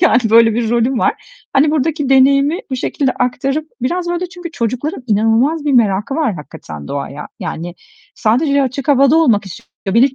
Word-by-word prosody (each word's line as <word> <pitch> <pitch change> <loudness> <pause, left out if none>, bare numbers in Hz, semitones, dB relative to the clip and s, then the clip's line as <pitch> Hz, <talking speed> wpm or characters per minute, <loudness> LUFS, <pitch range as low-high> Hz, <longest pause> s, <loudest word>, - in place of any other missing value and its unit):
yani, 320 -7 +4
böyle 225 0 +5
bir 230 -1 -1
rolüm 240 +2 +1
var. - - +2 0.4
Hani, 290 +3 +3
buradaki 300 -1 -1
deneyimi 275 +4 +4
bu 260 - -2
şekilde 265 +1 -1
aktarıp, 275 +5 -2
biraz 345 +7 -1
böyle, 350 +1 -2
çünkü 355 -1 -9
çocukların 255 - -3
inanılmaz 225 +9 +1
bir 290 - +1
merakı 215 0 +2
var 290 -9 0
hakikaten 75 - -10
doğaya. 140 +1 -5
Yani, 170 +2 -5 0.4
sadece 280 +6 +1
açık 265 +2 -4
havada 275 +2 +4
olmak 235 -12 +3
istiyorlar 195 +1 -8
Bir 275 - +4
de - - -21
265 Hz, 170 wpm, -16 LUFS, 225-295 Hz, 0.4 s, böyle